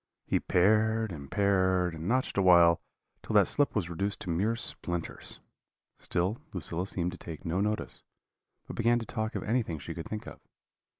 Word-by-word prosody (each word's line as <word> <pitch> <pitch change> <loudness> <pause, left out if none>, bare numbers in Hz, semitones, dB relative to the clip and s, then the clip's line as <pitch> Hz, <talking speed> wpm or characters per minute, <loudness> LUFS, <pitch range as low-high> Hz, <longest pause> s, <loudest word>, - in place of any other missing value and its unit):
He - - +1
pared 110 +3 +3
and 70 -5 -8
pared, 95 -3 +2
and 80 +2 -5
notched 130 +4 +1
awhile, 85 -3 +6 0.4
till - - -4
that - - +6
slip 145 - +1
was 100 -6 0
reduced 100 +4 -2
to 90 - -3
mere 100 +8 +1
splinters. 85 -7 -5 0.6
Still 95 +7 -1
Lucilla 90 +3 -2
seemed 90 -2 -1
to 90 - -10
take 80 +2 -8
no 90 +3 0
notice, 105 +1 -2 0.6
but - - -7
began 120 +1 +3
to 115 - -3
talk 110 0 -3
of - - -2
anything 110 -8 0
she 80 +3 -6
could 80 0 -6
think 105 -1 -5
of. - - -9
95 Hz, 175 wpm, -30 LUFS, 85-110 Hz, 0.6 s, awhile